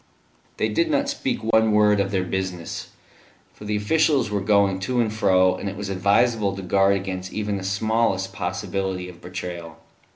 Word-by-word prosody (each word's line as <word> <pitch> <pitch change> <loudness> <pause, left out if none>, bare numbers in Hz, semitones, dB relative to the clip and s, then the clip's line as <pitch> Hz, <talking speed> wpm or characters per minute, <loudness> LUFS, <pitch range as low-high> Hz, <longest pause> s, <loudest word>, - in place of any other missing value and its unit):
They - - +1
did 335 0 0
not 285 -2 +1
speak 280 - -2
one 110 -1 +3
word 105 -1 +4
of 100 -1 +1
their 95 -2 0
business, 90 -2 -4 0.6
for 105 - -12
the 105 0 -1
officials 130 +2 +2
were 100 -1 0
going 100 -1 +2
to 120 +6 -1
and 110 -2 +1
fro, 95 -3 +3
and 100 - -4
it 100 - -8
was 100 -1 -5
advisable 100 +2 +2
to 95 - -7
guard 95 +2 +3
against 95 -1 -4
even 105 -1 -2
the 95 - -6
smallest 100 0 0
possibility 95 -2 -3
of 90 -1 -14
betrayal. 90 -2 -7
100 Hz, 175 wpm, -23 LUFS, 95-110 Hz, 0.6 s, word